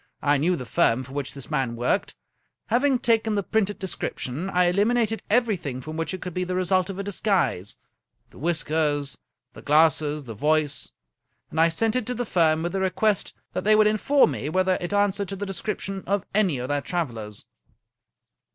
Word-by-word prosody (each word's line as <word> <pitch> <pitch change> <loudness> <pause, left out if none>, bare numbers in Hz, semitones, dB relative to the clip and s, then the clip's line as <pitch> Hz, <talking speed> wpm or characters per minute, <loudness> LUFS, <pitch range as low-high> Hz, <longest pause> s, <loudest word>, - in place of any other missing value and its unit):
I 145 0 +4
knew 170 +6 +2
the 130 - -6
firm 120 +1 +2
for 130 +1 -12
which 140 -1 -4
this 140 0 -10
man 135 -5 0
worked. 120 +1 -1 0.5
Having 255 +3 +3
taken 225 -2 +1
the 200 - 0
printed 205 0 0
description, 175 -3 -4
I 180 -1 +3
eliminated 220 +4 +1
every 230 -1 +3
thing 140 -8 -5
from 155 +4 -7
it - - -5
which 180 +3 -3
could 180 -1 -5
be 180 - -1
the 180 0 -3
result 185 0 +1
of 195 - -5
a 200 - -3
disguise, 190 - 0 0.3
— - - -43
^the - - -15
whiskers, 150 -3 0 0.3
the - - -11
glasses, 150 0 +3
the 115 -4 -7
voice, 150 +5 0 0.3
— - - -47
^and 160 - -1
I 165 +1 +6
sent 220 +7 0
it 255 -4 -1
to 250 - -2
the 245 +1 -2
firm 160 -5 +2
with 175 - -2
a 195 - -1
request 190 +2 0 0.2
that - - -2
they 215 +1 +5
would 215 0 +5
inform 215 - +3
me 130 +3 -3
whether 185 +2 +2
it 175 - -3
an 205 0 +3
swered 200 0 -4
to 195 - -5
the 200 +1 -4
description 195 0 -4
of 200 0 0
any 195 -8 +2
of 125 +1 -4
their 145 0 0
travelers. 115 - -4
180 Hz, 205 wpm, -25 LUFS, 145-205 Hz, 0.5 s, I